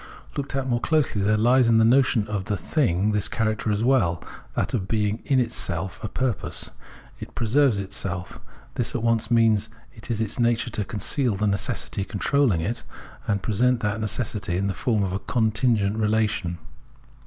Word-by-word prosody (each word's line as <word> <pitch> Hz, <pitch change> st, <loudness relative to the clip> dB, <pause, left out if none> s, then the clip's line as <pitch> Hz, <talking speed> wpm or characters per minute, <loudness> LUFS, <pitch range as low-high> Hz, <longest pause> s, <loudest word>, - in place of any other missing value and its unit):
Looked 140 Hz, -1 st, -4 dB
at 135 Hz, -1 st, -1 dB
more 120 Hz, -2 st, +1 dB
closely, 150 Hz, -8 st, +1 dB
there 105 Hz, +2 st, +2 dB
hes 120 Hz, +3 st, +4 dB
in 115 Hz, -1 st, +5 dB
the 110 Hz, -, +5 dB
notion 120 Hz, -3 st, +3 dB
of 105 Hz, -3 st, -3 dB
the 105 Hz, -1 st, -1 dB
thing 100 Hz, -, +1 dB
this 105 Hz, -2 st, +1 dB
character 110 Hz, -1 st, -1 dB
as 105 Hz, +1 st, 0 dB
well: 115 Hz, -10 st, +2 dB, 0.2 s
— -, -, -24 dB
that -, -, -1 dB
of 95 Hz, -6 st, -1 dB
being 105 Hz, 0 st, 0 dB
in 135 Hz, -3 st, +3 dB
itself 95 Hz, -6 st, -3 dB
a -, -, -1 dB
purpose. 125 Hz, 0 st, -2 dB, 0.5 s
It -, -, -9 dB
preserves 120 Hz, +1 st, +3 dB
itself; 95 Hz, -2 st, -4 dB, 0.3 s
this -, -, -2 dB
at -, -, -2 dB
once 115 Hz, -1 st, +1 dB
means 110 Hz, -2 st, +3 dB, 0.2 s
it 110 Hz, -2 st, -10 dB
is 115 Hz, -3 st, -1 dB
its 110 Hz, +2 st, -2 dB
nature 120 Hz, 0 st, +1 dB
to 105 Hz, -, -2 dB
conceal 120 Hz, +2 st, -1 dB
the 105 Hz, +2 st, -1 dB
necessity 100 Hz, 0 st, -1 dB
controlling 105 Hz, -, +1 dB
it, 115 Hz, +8 st, -3 dB, 0.5 s
and 100 Hz, -2 st, 0 dB
presents 120 Hz, +2 st, +1 dB
that 105 Hz, +1 st, -1 dB
necessity 105 Hz, -4 st, -2 dB
in 100 Hz, -, -1 dB
the 100 Hz, -, 0 dB
form 110 Hz, -2 st, 0 dB
of 95 Hz, -1 st, -2 dB
a 95 Hz, -, -1 dB
contin 115 Hz, +2 st, +1 dB
gent 100 Hz, 0 st, 0 dB
relation. 105 Hz, -5 st, 0 dB
110 Hz, 185 wpm, -24 LUFS, 100-120 Hz, 0.5 s, in